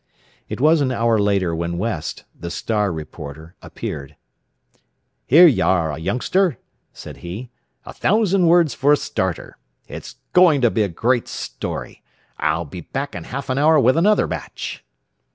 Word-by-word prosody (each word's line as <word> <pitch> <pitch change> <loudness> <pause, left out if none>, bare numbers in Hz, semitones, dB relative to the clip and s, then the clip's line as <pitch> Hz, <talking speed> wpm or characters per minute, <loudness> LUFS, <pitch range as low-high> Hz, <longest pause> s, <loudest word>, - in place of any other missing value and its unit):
It - - -5
was 155 +3 +4
an 130 -2 +1
hour 115 -2 +2
later 100 -4 +1
when 85 +1 -3
West, 95 -5 -3
the 85 - -7
"Star" 105 +2 -1
reporter, 80 0 -8
appeared. 70 +2 -7 1.1
"Here 165 +7 +8
you 150 -8 +4
are, 80 -5 +1
youngster," 125 - 0 0.3
said - - -10
he; 105 +9 -8 0.3
"a - - -9
thousand 195 -4 +2
words 165 -5 +4
for 140 +5 +3
a - - +4
starter. 95 - -3 0.3
It's - - -9 0.2
going 170 -6 +5
to 120 -3 +4
be 110 - 0
a 105 - +2
great 120 +8 0
story. - - -6 0.4
I'll 85 +1 0
be 85 +4 -8
back 140 - -5
in - - -7
half 140 +2 -6
an 130 - 0
hour 155 +1 +5
with 130 +1 +4
another 205 +6 +3
batch." - - -6
115 Hz, 155 wpm, -21 LUFS, -, 1.1 s, Here